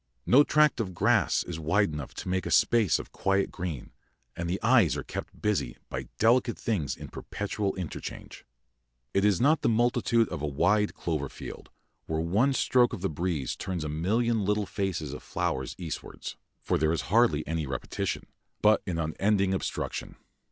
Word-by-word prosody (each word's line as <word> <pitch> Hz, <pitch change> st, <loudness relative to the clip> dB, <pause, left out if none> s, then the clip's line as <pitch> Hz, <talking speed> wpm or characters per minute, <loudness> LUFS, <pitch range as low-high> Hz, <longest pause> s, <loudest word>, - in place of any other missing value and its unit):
No 135 Hz, +4 st, +7 dB
tract 150 Hz, -2 st, +3 dB
of 95 Hz, -5 st, -3 dB
grass -, -, +3 dB
is 80 Hz, -2 st, -6 dB
wide 80 Hz, +3 st, +2 dB
enough 75 Hz, -2 st, -6 dB
to -, -, -6 dB
make 95 Hz, -1 st, -1 dB
a -, -, -3 dB
space 105 Hz, +3 st, +4 dB
of -, -, -8 dB
quiet 95 Hz, 0 st, 0 dB
green, 85 Hz, -7 st, -5 dB, 0.4 s
and 85 Hz, 0 st, -3 dB
the 95 Hz, -, -1 dB
eyes 110 Hz, -, +4 dB
are 70 Hz, -, -4 dB
kept -, -, -7 dB
busy 105 Hz, -13 st, -1 dB
by 65 Hz, -1 st, -5 dB
delicate 120 Hz, +2 st, +3 dB
things 95 Hz, -11 st, -1 dB
in -, -, -8 dB
perpetual 105 Hz, -1 st, -3 dB
interchange. 90 Hz, -4 st, -7 dB, 0.7 s
It 100 Hz, -, +2 dB
is 105 Hz, -4 st, +3 dB
not 150 Hz, +5 st, +4 dB
the -, -, +2 dB
multitude 115 Hz, 0 st, +2 dB
of -, -, -5 dB
a 75 Hz, -, -1 dB
wide 100 Hz, +9 st, +2 dB
clover 75 Hz, -5 st, -2 dB
field, -, -, -9 dB, 0.4 s
where 80 Hz, 0 st, -1 dB
one 105 Hz, +12 st, +2 dB
stroke 125 Hz, -2 st, +3 dB
of -, -, -5 dB
the 95 Hz, -, 0 dB
breeze 80 Hz, -4 st, -2 dB
turns 90 Hz, -4 st, -4 dB
a 75 Hz, -, -3 dB
million 110 Hz, +8 st, +1 dB
little 105 Hz, +1 st, +1 dB
faces 90 Hz, -8 st, -3 dB
of -, -, -7 dB
flowers 65 Hz, -1 st, -2 dB
eastwards, 85 Hz, -4 st, -6 dB, 0.3 s
for -, -, +1 dB
there 80 Hz, +1 st, +2 dB
is 85 Hz, -, 0 dB
hardly 110 Hz, -11 st, +4 dB
any 80 Hz, -2 st, -2 dB
repetition, 65 Hz, -1 st, -3 dB, 0.4 s
but 105 Hz, 0 st, +4 dB
an 90 Hz, -3 st, -1 dB
unending 95 Hz, +5 st, +1 dB
obstruction. 95 Hz, -, -3 dB
95 Hz, 175 wpm, -28 LUFS, 80-110 Hz, 0.7 s, No